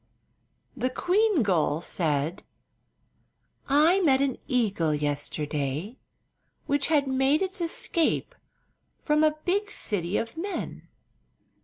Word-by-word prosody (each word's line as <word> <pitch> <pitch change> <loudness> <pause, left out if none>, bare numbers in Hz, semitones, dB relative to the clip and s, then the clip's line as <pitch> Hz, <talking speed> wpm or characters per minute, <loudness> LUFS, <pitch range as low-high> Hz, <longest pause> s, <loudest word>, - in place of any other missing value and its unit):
The 255 0 -1
queen 370 - +2
gull 160 -6 +1
said: 160 0 -1 1.3
"I 310 +7 +5
met 280 -8 +4
an 275 -2 0
eagle 200 -11 +1
yesterday, 145 - -3 0.7
which 285 -1 +1
had 295 -2 +3
made 270 +5 +2
its 380 0 -4
escape 335 +6 0 0.7
from 300 0 +2
a 310 0 +2
big 405 +3 0
city 185 -3 -1
of 230 0 -3
men. 385 +5 -5
265 Hz, 105 wpm, -27 LUFS, -, 1.3 s, I